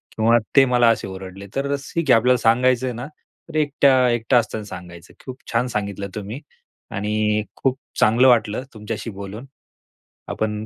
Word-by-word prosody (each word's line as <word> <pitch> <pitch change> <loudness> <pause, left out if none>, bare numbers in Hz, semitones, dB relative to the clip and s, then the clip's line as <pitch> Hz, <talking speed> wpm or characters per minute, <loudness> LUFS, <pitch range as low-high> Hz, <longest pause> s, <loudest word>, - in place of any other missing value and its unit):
किंवा 115 +2 +4 0.2
ते 135 -1 +7
मला 120 -2 +4
असे 115 - 0
ओरडले 95 +1 -9
तर 140 +1 0
ठीक 145 +2 -4
आहे 120 - +8
आपल्याला 125 +2 +3
सांगायचं 125 +2 +2
आहे 125 - -2
ना 125 +3 -6 0.4
तर 160 - -10
एक 145 -2 0
एकटा 125 -2 +4
असताना 110 -1 -1
सांगायचं 90 -2 -11
की - - -23
खूप 130 -1 -8
छान 120 +2 +1
सांगितलं 100 -3 -3
तुम्ही 105 +6 -6 0.5
आणि 105 +1 0
खूप 135 -1 0 0.2
चांगलं 120 +4 +5
वाटलं 115 -1 +2
तुमच्याशी 110 +1 -6
बोलून. 100 +4 -8 0.8
आपण 105 0 -3
115 Hz, 165 wpm, -21 LUFS, 105-125 Hz, 0.8 s, आहे